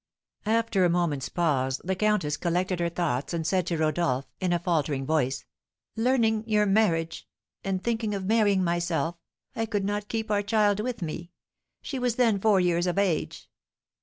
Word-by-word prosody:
After 225 -3 +2
a 175 - +4
moment's 170 -6 0
pause, 135 -6 0
the 190 - -1
countess 185 -7 +1
collected 180 +2 -1
her 170 0 +1
thoughts, 170 -3 -2
and 165 -1 -2
said 185 0 +1
to 170 - -1
Rodolph, 155 -4 0
in 185 -1 0
a 175 - +3
faltering 155 -5 -1
voice, 135 -4 0 0.5
"Learning 225 -2 +2
your 210 -1 +3
marriage, 190 -6 +1 0.4
and 190 -1 -2
thinking 225 -3 -1
of 195 -1 -4
marrying 205 -3 +3
myself, 170 -1 -1 0.4
I 225 - -1
could 205 -3 -1
not 205 0 -2
keep 220 -1 -2
our 205 -1 +2
child 205 -1 +2
with 230 -2 -3
me; 170 +2 -5 0.5
she 270 - -4
was 245 -2 0
then 230 -5 +3
four 205 -1 +4
years 175 0 +1
of 180 - -1
age." 190 -6 -1
185 Hz, 170 wpm, -27 LUFS, 165-215 Hz, 0.5 s, a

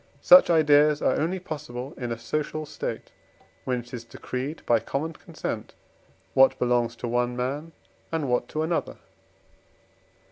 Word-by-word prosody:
Such 270 -6 +8
ideas 150 -2 +5
are - - +2
only 170 +5 0
possible 145 -7 -6
in 120 -2 -5
a 115 - -2
social 155 +5 -3
state, - - -6 0.5
when 125 -2 -1
it 120 +1 -17
is 120 -2 -5
decreed 130 +5 -6
by 115 -1 +4
common 155 +8 -3
consent - - -6 0.6
what 135 +4 +5
belongs 120 -1 +1
to 120 - -5
one 120 +1 0
man 140 +6 -3 0.4
and 160 -3 -1
what 125 -1 0
to 155 - -2
another. 165 +1 -2
135 Hz, 145 wpm, -26 LUFS, 125-155 Hz, 0.6 s, Such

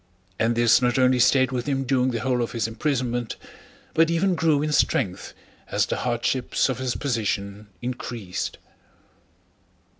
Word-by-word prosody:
And 115 +1 +2
this 120 +1 +4
not 125 0 +1
only 130 -1 +4
stayed 130 +1 +4
with 125 0 -3
him 135 -1 0
during 130 -1 +1
the 115 -3 -2
whole 125 0 0
of 115 - -3
his 115 -1 -1
imprisonment, 120 -1 -2 0.6
but 165 0 +4
even 180 +3 +2
grew 160 -3 +2
in 155 - -1
strength 105 -9 0 0.3
as - - +1
the - - -3
hardships 125 +2 0
of 130 -2 -2
his 130 -2 -2
position 105 -5 -2 0.2
increased. 120 -6 -4
125 Hz, 150 wpm, -24 LUFS, 115-135 Hz, 0.6 s, this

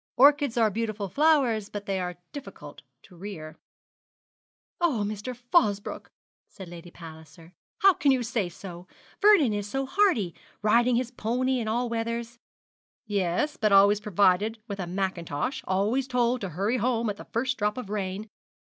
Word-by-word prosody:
Orchids 285 -1 +5
are 220 -2 +3
beautiful 215 -2 -3
flowers, 265 - +2
but 205 -1 -6
they 195 -1 -1
are 180 -1 -4 0.2
difficult 285 -1 -10 0.2
to 180 - -17
rear.' 170 -4 -8 1.2
'Oh, 300 -12 +1
Mr. 210 +4 -5
Fosbroke,' 240 - 0 0.4
said 190 -4 -11
Lady 175 0 -10
Palliser, 160 0 -13 0.3
'how 390 -1 +8
can 290 - +1
you 255 -2 +1
say 225 -5 -1
so! 175 0 -10 0.3
Vernie 375 - +5
is 205 0 -4
so 270 +4 -2
hardy 265 - +2 0.3
riding 235 +3 +4
his 245 0 -1
pony 255 +2 -1
in 225 - -3
all 240 +3 0
weathers.' 230 +1 -3 0.7
'Yes, 200 - -1
but 215 -2 +1
always 200 +1 +6
provided 205 +1 +2
with 200 -2 -6
a 180 - -3
mackintosh 185 - -3
always 210 +8 +1
told 250 -1 +1
to 195 - -3
hurry 200 +9 -1
home 235 -1 0
at 205 -1 -2
the - - -10
first 255 +1 -2
drop 210 +1 0
of 220 -6 -6
rain. 200 0 -3
215 Hz, 155 wpm, -27 LUFS, 195-250 Hz, 1.2 s, how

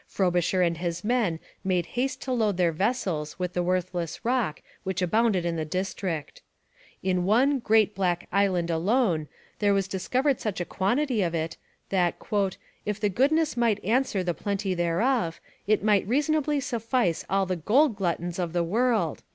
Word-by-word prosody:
Frobisher 180 -1 +1
and 170 -1 0
his 175 -1 -3
men 210 -8 +1 0.2
made 180 -3 +1
haste 260 +2 -1
to 260 - -4
load 220 -6 +1
their 175 -2 +3
vessels 175 -5 -1
with 180 -1 -3
the 180 - 0
worthless 175 -1 -2
rock 240 -10 0 0.2
which 190 0 -2
abounded 195 0 +2
in 170 -1 -1
the 160 - -1
district. 180 -1 -4 0.6
In 180 -1 +1
one 255 +9 +3
'great 220 -3 +3
black 180 -3 -1
island 185 -4 +1
alone' 175 -2 +1 0.3
there 205 -1 +3
was 195 -1 0
discovered 250 +9 0
such 210 -4 -3
a 175 - -2
quantity 240 +6 0
of 170 -2 0
it 160 0 -2 0.3
that 180 -3 +1 0.7
'if 210 0 -3
the 210 -1 +1
goodness 300 - +2
might 230 -5 +1
answer 225 -3 +1
the 175 -1 0
plenty 200 +3 -2
thereof, 175 +3 0 0.3
it 215 0 +2
might 205 -3 +3
reasonably 295 +3 +1
suffice 230 - 0
all 195 0 +2
the 185 0 -1
gold 235 - +3
gluttons 175 -2 -2
of 170 -2 -2
the 175 -1 +1
world.' 215 - +1
195 Hz, 165 wpm, -26 LUFS, 175-235 Hz, 0.7 s, their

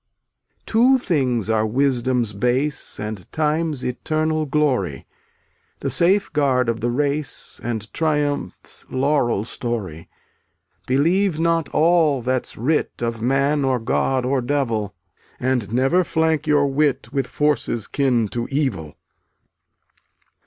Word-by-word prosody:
Two 250 +4 +4
things 130 - 0
are 110 -1 +2
wisdom's 125 -1 0
base 125 +8 -1
And 105 -3 -6
time's 155 -2 0
eternal 155 +4 -1
glory, 130 - 0 0.8
The 135 - -2
safeguard 145 - +2
of 115 -1 -1
the 120 +2 -1
race 145 +2 -3
And 110 -2 -4
triumph's 150 - -2
laurel 130 -6 +1
story: 105 -10 -5 0.8
Believe 170 +7 +2
not 165 -2 +1
all 155 -5 +3
that's 130 0 -1
writ 140 0 -1
Of 115 -1 -2
man 140 +4 +1
or 130 -1 +2
god 125 +2 0
or 130 0 +1
devil, 120 -7 -1 0.4
And 125 -5 -1
never 135 +9 +3
flank 160 -2 0
your 145 -1 +4
wit 140 -4 0
With 135 -3 0
forces 145 -7 0
kin 125 -6 +1
to 120 +2 -3
evil. 120 - -2
135 Hz, 115 wpm, -21 LUFS, 120-150 Hz, 0.8 s, Two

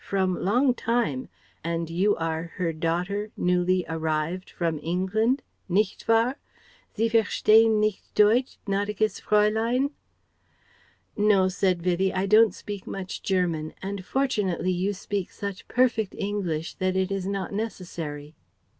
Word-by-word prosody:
from 190 -2 0
long 245 +9 +2
time, 230 - -1 0.3
and 165 0 -2
you 185 +6 +2
are 165 0 -3
her 170 -3 -1
daughter 180 +6 -1
newly 180 0 +2
arrived 160 +2 -2
from 165 -3 -2
England? 195 - 0 0.3
Nicht 195 +2 0
wahr? 230 +4 +3 0.6
Sie 225 - +2
verstehen 225 0 +4
nicht 215 -2 0
Deutsch, 225 +5 +3
gnädiges 205 +1 -1
Fraulein?" 220 +6 +2 1.2
"No," 205 -3 +4
said 185 -2 0
Vivie, 185 +1 +1
"I 190 0 -1
don't 215 0 +5
speak 205 -2 -7
much 190 -1 -5
German, 170 -5 -1
and 195 0 -4
fortunately 205 -8 0
you 185 +3 0
speak 200 -1 -4
such 200 -2 -6
perfect 235 -5 +1
English 180 -6 -2
that 185 -1 0
it 190 +1 0
is 195 -1 -2
not 195 0 -3
necessary." 165 -8 -5
195 Hz, 130 wpm, -26 LUFS, 175-215 Hz, 1.2 s, don't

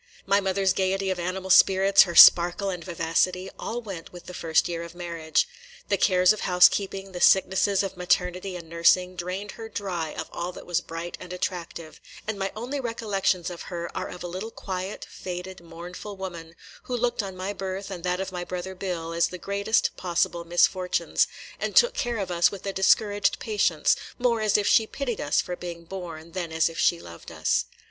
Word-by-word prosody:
My 200 +1 +3
mother's 195 -1 +1
gayety 190 0 0
of 185 - -3
animal 185 +2 -3
spirits, 195 +1 +6
her 170 - -5
sparkle 175 +4 +7
and 180 -2 -6
vivacity, 180 +2 0
all 240 +1 -4
went 190 -6 -8
with 175 -1 -12
the 180 - -9
first 165 -2 +1
year 170 -1 -4
of 170 0 -9
marriage. 170 - -1 0.4
The 200 - +3
cares 185 0 +4
of 215 - -7
house 180 0 +6
keeping, 195 -1 -4
the 180 -1 -7
sicknesses 190 +1 +4
of 195 - -4
maternity 180 +1 0
and 170 -2 -8
nursing, 170 +2 +3
drained 185 +4 -5
her 225 -1 -9
dry 180 -7 -4
of - - -4
all 175 +1 -4
that - - -11
was 175 -1 0
bright 165 +1 -7
and 180 -1 -10
attractive; 175 -3 -5 0.3
and 215 -2 -3
my 195 0 -2
only 250 +6 -4
recollections 205 -7 -1
of 175 - -8
her 170 -2 -5
are - - -3
of 180 - -9
a - - -4
little 185 +6 -5
quiet, 190 -2 -5
faded, 180 0 -7
mournful 175 +4 -9
woman, 170 -3 -7 0.3
who 250 - -2
looked 240 -1 0
on 190 -2 -7
my 190 +2 -3
birth 195 0 -5
and 175 -3 -7
that 180 0 -1
of 190 0 -4
my 180 -1 -4
brother 180 +1 -5
Bill 175 -3 -4
as 170 0 +2
the 180 - -7
greatest 200 +4 0
possible 175 -1 -1
misfortunes, 180 +2 +2 0.3
and - - -3
took 485 +1 +6
care 240 - -2
of 195 -3 -3
us 175 0 +4
with 195 0 -9
a 195 - -2
discouraged 205 +1 +2
patience, 195 -8 +1 0.2
more 240 -2 +1
as 215 -1 +3
if 205 - 0
she 220 +1 +4
pitied 255 -3 -4
us 145 - +2
for 180 - -5
being 170 -1 -7
born 170 -2 -8
than 170 -2 -4
as 160 +1 +2
if 165 - -8
she 170 - +3
loved 85 - -11
us. - - 0
185 Hz, 200 wpm, -26 LUFS, 175-195 Hz, 0.4 s, sparkle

